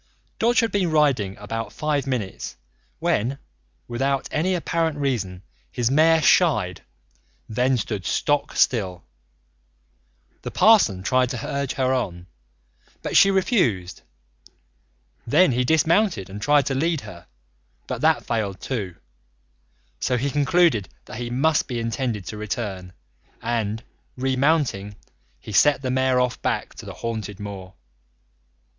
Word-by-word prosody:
Dodge 240 +3 +3
had 230 - 0
been 190 -4 +1
riding 140 -11 +2
about 115 +2 -5
five 150 -2 -1
minutes 120 -8 -4 0.4
when, 125 - 0 0.5
without 135 +3 -1
any 180 +5 +1
apparent 165 -2 -1
reason, 105 -10 -2 0.3
his 120 0 0
mare 160 +2 +4
shied, 105 - +3 0.7
then 125 +4 +1
stood 105 -3 -3
stock 145 0 0
still. 95 -7 +1 1.4
The - - -5
parson 190 - +4
tried 130 +4 +2
to 125 -3 -4
urge 140 -1 -2
her 130 -1 +1
on, 90 -9 -3 0.8
but - - -3
she 195 - +7
refused; 175 - +1 1.3
then 155 +6 +5
he 125 +1 +1
dismounted 160 - +2
and 105 +1 -7
tried 145 +1 +3
to 135 - -1
lead 160 +2 0
her, 85 0 -11 0.6
but - - -5
that - - +2
failed 100 -4 -2
too. 100 -10 -4 1.0
So 125 - 0
he 135 +3 -1
concluded 145 - +2 0.2
that - - -9
he 120 -1 -4
must 145 +5 +1
be 120 -3 -3
intended 115 -3 -2
to 105 - -6
return, 100 -4 -5 0.5
and, 115 -1 -2 0.3
remounting, 130 -6 0 0.4
he 85 - -10
set 140 +6 +4
the 130 - -1
mare 130 0 +2
off 125 -1 -1
back - - -2
to - - -9
the - - -6
haunted 110 -3 -5
moor. 95 -2 -8
125 Hz, 130 wpm, -23 LUFS, 105-145 Hz, 1.4 s, she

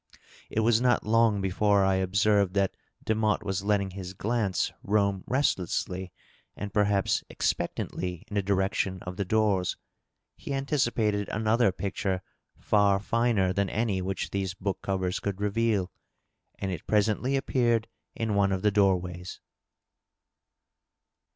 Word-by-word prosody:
It 110 - 0
was 115 +1 +3
not 125 -1 +2
long 110 -2 +3
before 100 +1 +2
I 95 0 +2
observed 100 +1 +2
that 100 -1 +1 0.3
Demotte 110 -1 +1
was 95 -1 -2
letting 100 -2 +1
his 95 0 -7
glance 105 -2 0
roam 100 -2 +1
restlessly 95 - -1 0.4
and 100 -2 -6
perhaps 100 -2 +2
expectantly 90 -2 -2
in - - -11
the 100 - +2
direction 95 -1 0
of 90 0 -6
the 100 - -1
doors. 100 -3 +1 0.6
He 140 - -5
anticipated 120 -7 0
another 110 0 +2
picture 95 0 -2 0.3
far 100 -2 +3
finer 105 -3 +1
than 100 -1 0
any 105 -4 0
which 95 +1 -3
these 95 -2 -2
book 95 0 -3
covers 95 -1 -1
could 100 -1 -3
reveal. 105 -2 0 0.7
And 95 - -3
it 90 - -6
presently 110 +5 +1
appeared 120 -4 +1 0.3
in 110 -2 -1
one 100 -1 +3
of 95 -1 -1
the 105 - +4
door 100 -2 +4
ways. 90 0 -8
100 Hz, 135 wpm, -28 LUFS, 95-110 Hz, 0.7 s, the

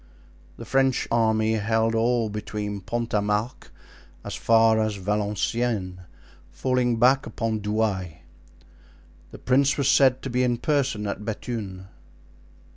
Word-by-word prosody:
The - - -9
French 135 -1 +1
army 110 -1 +2
held 110 +1 +1
all 115 0 +1
between 105 -1 -5
Pont 120 +5 -4
a 105 - +2
Marc 105 +4 -3 0.5
as - - -6
far 115 -1 +3
as 110 -1 0
Valenciennes, 105 0 -2 0.5
falling 125 -2 0
back 130 +4 +3
upon 115 -2 -2
Douai. 105 -3 -1 1.2
The - - -11
prince 135 +2 +2
was 140 -1 +2
said 130 -2 +4
to 135 - -4
be 125 +1 +1
in 125 -1 +1
person 135 -5 -1
at 100 +1 -4
Bethune. 105 -4 -5
110 Hz, 125 wpm, -24 LUFS, 105-125 Hz, 1.2 s, said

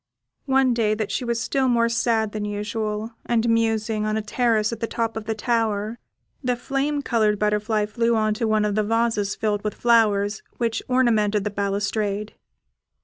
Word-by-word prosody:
One 265 -2 +3
day 215 -2 +1
that 215 -1 -3
she - - -1
was 235 -1 -1
still 265 +3 0
more 235 -2 +3
sad 230 -2 +1
than 215 0 -4
usual, 210 +1 -3
and 235 -1 +1
musing, 225 -1 +1
on 215 0 0
a - - 0
terrace 220 -1 +1
at 230 - -6
the 230 - -2
top 230 -1 -2
of 220 -1 -5
the 220 - -2
tower, 220 -1 -1 0.4
the 250 -1 +1
flame 280 +3 -2
coloured 215 -4 +2
butterfly 210 +1 +1
flew 230 +2 0
on 215 -1 +2
to 220 +1 -1
one 215 -1 +2
of 210 - 0
the 215 - +2
vases 225 -2 0
filled 210 -2 -1
with 210 - -3
flowers, 215 -3 +2 0.2
which 230 -2 -1
ornamented 220 -5 +2
the 210 - -2
balustrade. 200 +1 -2
220 Hz, 180 wpm, -23 LUFS, 210-235 Hz, 0.4 s, One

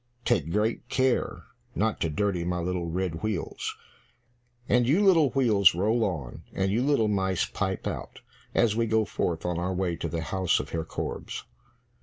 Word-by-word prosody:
Take 85 - +1
great 110 +5 0
care 130 -1 +1 0.3
not 110 +1 0
to 80 - +1
dirty 90 +2 0
my 90 +1 -1
little 90 0 -2
red 85 -1 -2
wheels. 110 -5 -3 0.9
And 120 -1 +3
you 180 +10 +4
little 165 -7 +6
wheels, 110 -9 +4
roll 110 +6 +2
on, 80 - -3
and 95 0 0
you 115 +4 +1
little 135 -5 +3
mice 95 -3 +1
pipe 95 -2 -3
out, - - -5 0.3
as 110 -3 +3
we 115 0 +1
go 110 0 +2
forth 85 -4 -2
on 90 -1 -1
our 90 +1 -1
way 90 -2 0
to 85 - -3
the 80 +1 -2
house 95 +3 +1
of - - -6
Herr 80 -1 -2
Korbes." - - -5
95 Hz, 175 wpm, -27 LUFS, 85-115 Hz, 0.9 s, little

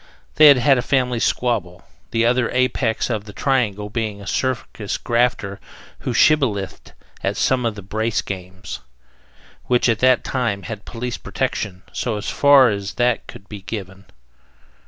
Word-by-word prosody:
They 155 +1 +9
had 140 -2 +8
had 125 +1 +4
a - - +1
family 125 -2 0
squabble, 110 -9 -1 0.3
the 115 0 +1
other 120 0 +2
apex 125 -2 0
of 110 -2 -2
the 105 - -10
triangle 110 -7 0
being 110 -3 -3
a 100 - -10
circus 110 -4 -2
grafter 115 -5 0 0.4
who - - -3
"shibbolethed" 110 -11 +1 0.3
at - - -1
some 125 -2 +2
of 110 - -3
the 100 - -9
"brace 110 +3 -1
games," 95 -1 -7 0.9
which 125 0 +2
at 115 -2 +2
that 130 0 +4
time 120 -7 -2
had 110 -3 -7
police 120 0 -5
protection, 105 -8 -3
so 110 -4 -2
far 140 +4 +5
as 100 -1 -4
that 120 -1 +1
could 100 - -12
be 105 -2 -8
given. 95 -1 -7
115 Hz, 155 wpm, -21 LUFS, 100-125 Hz, 0.9 s, They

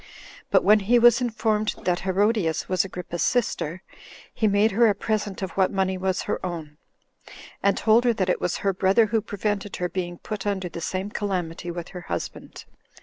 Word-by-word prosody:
But - - +4
when 210 +1 +6
he 220 +5 +3
was 240 +1 +6
informed 215 -2 0
that 180 0 +1
Herodias 190 -3 +1
was 185 -2 +2
Agrippa's 180 -2 -6
sister, 185 -8 0 0.5
he 220 - +1
made 205 +2 +3
her 230 +3 +4
a 205 - +2
present 205 -2 -2
of 185 - -3
what 190 0 +1
money 190 -1 0
was 185 0 -1
her - - -3
own, 160 -4 -6 0.8
and 200 - +2
told 225 +2 +4
her 240 - +4
that 190 -4 -1
it 180 - 0
was 180 - -1
her 195 - +3
brother 195 +4 +3
who 220 +1 0
prevented 205 -1 -3
her 180 0 -2
being 175 -2 -4
put 210 +1 -5
under 190 -3 -1
the 170 - -7
same 190 +4 -3
calamity 180 -5 -3
with 175 0 -6
her 180 - -8
husband. - - -6
195 Hz, 190 wpm, -24 LUFS, 180-215 Hz, 0.8 s, when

